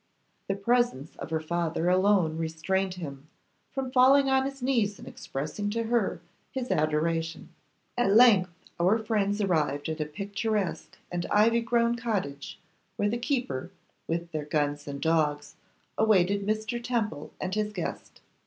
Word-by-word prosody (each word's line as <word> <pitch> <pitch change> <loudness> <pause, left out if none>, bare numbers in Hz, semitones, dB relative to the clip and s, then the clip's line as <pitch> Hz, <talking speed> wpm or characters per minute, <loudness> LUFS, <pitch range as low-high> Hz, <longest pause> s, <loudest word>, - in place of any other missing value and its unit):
The 195 - 0
presence 215 - 0
of - - -7
her 160 0 0
father 165 +1 -1
alone 185 -3 +3
restrained 180 +4 -1
him 145 -5 -8 0.4
from 265 -2 -3
falling 270 +1 +5
on 265 0 +3
his 275 -1 -5
knees 230 -6 +1
and - - -12
expressing 155 +9 -4
to 230 +2 -1
her 225 -6 0 0.3
his 255 -1 -3
adoration. 165 +2 0 0.5
At 245 -5 +2
length 215 -6 +7 0.3
our 185 +6 +4
friends 210 -2 0
arrived 150 -6 0
at 160 0 -3
a - - 0
picturesque 205 +3 -3
and 175 -1 -2
ivy 230 +3 +4
grown 235 0 +2
cottage, 190 -12 -3 0.4
where 205 - +1
the 235 +2 -2
keeper, 245 - -2 0.4
with 170 +1 -3
their 155 -2 -3
guns 145 -1 -1
and 140 -1 -5
dogs, 150 -2 +1 0.5
awaited 200 -2 +3
Mr. 215 +3 -1
Temple 215 -12 -2
and 185 0 -3
his 210 0 0
guest. 185 -5 -6
195 Hz, 145 wpm, -28 LUFS, 160-230 Hz, 0.5 s, length